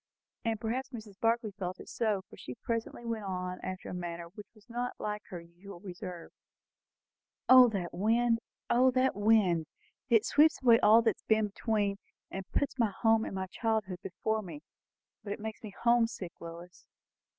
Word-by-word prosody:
And 225 -2 -1
perhaps 250 +4 -2
Mrs. 220 -6 -10
Barclay 230 -1 +1
felt 185 -2 -5
it - - -10
so, 210 -4 -1
for - - -14
she 125 - -8
presently 230 - -4
went 225 -2 -3
on 180 -1 -3
after 185 0 -6
a - - -5
manner 170 -1 -5
which 205 +3 -11
was 210 -1 -21
not 245 +1 -3
like 210 0 -3
her 180 -4 -6
usual 175 +3 -12
reserve. 180 -2 -8 1.2
"O 255 -1 +9
that 190 -5 -3
wind! 230 +5 +2 0.3
O 255 +2 +5
that 255 -1 +2
wind! 205 -6 +3 0.4
It 225 -3 +4
sweeps 310 +2 +4
away 230 -2 +7
all 225 +2 +6
that 225 - +2
has - - -27
been 220 -1 +3
between, 205 -1 0 0.3
and 190 0 -6
puts 285 - 0
home 225 +1 +2
and - - -5
my 190 0 -2
childhood 210 -2 -2
before 215 +3 -2
me. 210 +9 -9 0.6
But 200 - -3
it - - -8
makes 220 0 -6
me 215 - -7
home 235 -1 +5
sick, 185 -6 -7
Lois!" 170 +1 -10
210 Hz, 175 wpm, -31 LUFS, 185-230 Hz, 1.2 s, O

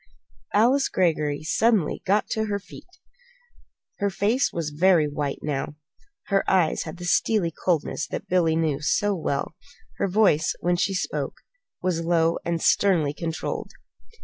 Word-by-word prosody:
Alice 250 +6 +4
Greggory 155 -5 +1
got - - -12
suddenly 200 -1 +1 0.3
to 220 0 0
her 205 -1 -1
feet. 200 - -13 1.1
Her 200 - +1
face 210 +7 +1
was 160 -3 -3
very 165 0 +3
white 145 -1 -4
now. 150 0 -3 0.5
Her 195 -1 +2
eyes 180 -4 +2
had 160 +2 -7
the 175 - -7
steely 175 -1 +2
coldness 160 -2 -1
that - - -6
Billy 170 -3 +2
knew 155 -3 0
so 205 +6 +1
well. 150 -6 -2 0.4
Her 200 - 0
voice, 190 -5 +2
when 175 +1 +1
she 195 +2 0
spoke, 180 - -3 0.4
was 180 -2 0
low 165 -1 +2
and 170 -1 -1
sternly 165 -6 +2
controlled. 165 0 -4
175 Hz, 145 wpm, -24 LUFS, 155-195 Hz, 1.1 s, Alice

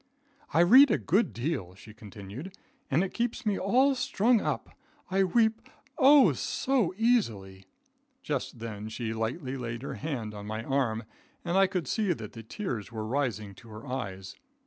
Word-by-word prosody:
"I 160 - +4
read 260 +11 +8
a - - +3
good 200 +8 +1
deal," 120 - -3
she 105 +2 -14
continued, 110 - -10 0.3
"and 155 +5 +2
it 195 - -4
keeps 240 +1 -2
me 205 -2 +1
all 255 +8 +3
strung 250 -3 +2
up. - - -3 0.4
I 195 +1 +3
weep, 220 +3 +1 0.3
O 280 -1 +7
so 255 -9 0
easily." 110 - 0 0.6
Just 140 -4 -3
then 110 -2 -6
she 110 0 -4
lightly 130 +5 -3
laid 120 -1 -5
her - - -4
hand 125 -8 -4
on 105 0 -8
my 110 +1 -4
arm, 120 -4 0 0.4
and 175 +1 -1
I 195 0 +5
could 180 -6 -3
see 205 - +1
that 110 -8 -9
the 115 - -8
tears 115 - -5
were 110 -1 -4
rising 110 -5 -2
to 115 +4 -16
her 110 +1 -10
eyes. 95 -7 -5
135 Hz, 170 wpm, -29 LUFS, -, 0.6 s, read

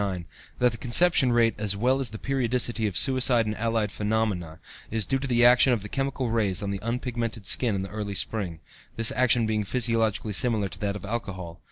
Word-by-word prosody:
1909) 95 -4 -7
that 125 0 +2
the 115 - -7
conception 135 +1 +3
rate, 115 -2 +3
as 105 -2 0
well 130 +5 +1
as 130 -4 -1
the 110 - -8
periodicity 120 -3 -1
of 95 - -4
suicide 130 -3 +4
and 105 0 -3
allied 115 -2 -1
phenomena, 105 -7 -2 0.3
is 110 -2 -1
due 135 - -1
to 135 - -4
the 120 -1 +3
action 125 +2 +6
of 110 -5 -2
the 105 - -8
chemical 135 -2 -2
rays 105 -5 0
on 100 - -3
the 100 - -4
unpigmented 115 -2 -4
skin 115 +1 +2
in 95 0 -3
early 100 0 -6
spring, 90 -5 -2 0.4
this 115 -1 +2
action 120 -1 +2
being 110 -1 -1
physiologically 115 -2 0
similar 110 -2 +2
to - - -11
that 100 -1 -2
of 105 - -8
alcohol. 95 -6 -6
115 Hz, 205 wpm, -25 LUFS, 100-125 Hz, 0.4 s, action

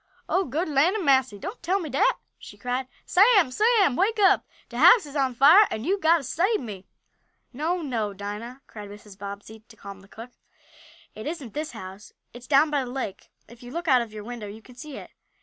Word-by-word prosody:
"Oh 380 +1 +1
good 310 +8 -2
land 305 +6 +2
a'massy! 265 - +2
Don't 385 - -8
tell 370 +4 0
me 340 - -5
dat!" 275 -1 +2 0.3
she - - -13
cried. 250 +1 -3 0.2
"Sam! 395 - +4
Sam! 420 - +3
Wake 430 - +1
up. 400 0 +4 0.2
De 235 - -6
house 360 - +7
is 290 0 -12
on 265 -3 0
fire 320 - +7
an' 220 - -5
you'se 390 +6 -1
got 330 0 +4
t' 305 - -7
sabe 370 - 0
me!" 200 -6 -9 0.7
"No, 330 +6 -2
no, 225 -7 -2
Dinah!" 210 +6 -8
cried 210 -2 -10
Mrs. 205 -1 -13
Bobbsey, 200 +2 -9
to 225 - -17
calm 200 -2 -11
the 195 - -19
cook. 230 +4 -11 0.8
"It 215 - -8
isn't 295 -8 -6
this 300 -2 -5
house. 195 -2 -11 0.2
It's 245 +1 -12
down 295 +2 +4
by 285 -2 0
the 250 - -7
lake. 245 -7 -6 0.2
If 235 0 -16
you 245 - -11
look 340 +6 -6
out 260 -4 +5
of 230 -2 -7
your 215 -1 -8
window 230 -2 -7
you 215 +2 -11
can 250 - -16
see 280 +3 -10
it." - - -11
260 Hz, 215 wpm, -25 LUFS, 220-335 Hz, 0.8 s, house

